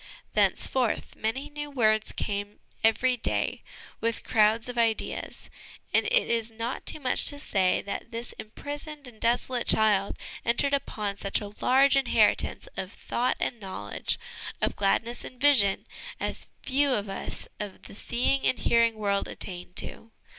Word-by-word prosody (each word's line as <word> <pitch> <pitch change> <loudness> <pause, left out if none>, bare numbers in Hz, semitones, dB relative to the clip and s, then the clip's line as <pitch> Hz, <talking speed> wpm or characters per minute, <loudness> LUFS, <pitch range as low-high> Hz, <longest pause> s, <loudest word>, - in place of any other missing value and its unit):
Thenceforth, 250 -4 +1
many 245 +6 -2
new 295 0 -6
words 220 -5 +2
came 205 0 -3 0.3
every 230 +3 +4
day 230 - 0 0.4
with 230 0 -1
crowds 220 +1 +3
of 245 - -5
ideas; 230 -2 -1 0.5
and - - +4
it - - +3
is 230 -1 0
not 230 +3 -5
too - - +2
much 260 -3 +4
to 285 - +3
say 190 -9 +1
that 200 - -5
this 230 +1 -5
imprisoned 290 +5 -7
and 230 -3 -14
desolate 240 +1 +1
child 205 -2 +3 0.3
entered 260 +4 +2
upon 210 -7 -1
such 195 - -1
a 205 -1 -7
large 270 +2 +5
inheritance 275 - +2
of - - -4
thought 250 +1 -1
and 240 - -1
knowledge, 185 - -3 0.4
of - - 0
gladness 225 +4 0
and 250 - -10
vision, 250 -9 +4 0.3
as - - -3 0.2
few 275 0 +2
of 205 -2 -2
us 195 - -5
of 205 -2 -6
the - - -11
seeing 250 +6 0
and - - +2
hearing 230 -1 +3
world 200 -2 0
attain 180 -2 -7
to. 225 - -6
230 Hz, 150 wpm, -28 LUFS, 210-260 Hz, 0.5 s, large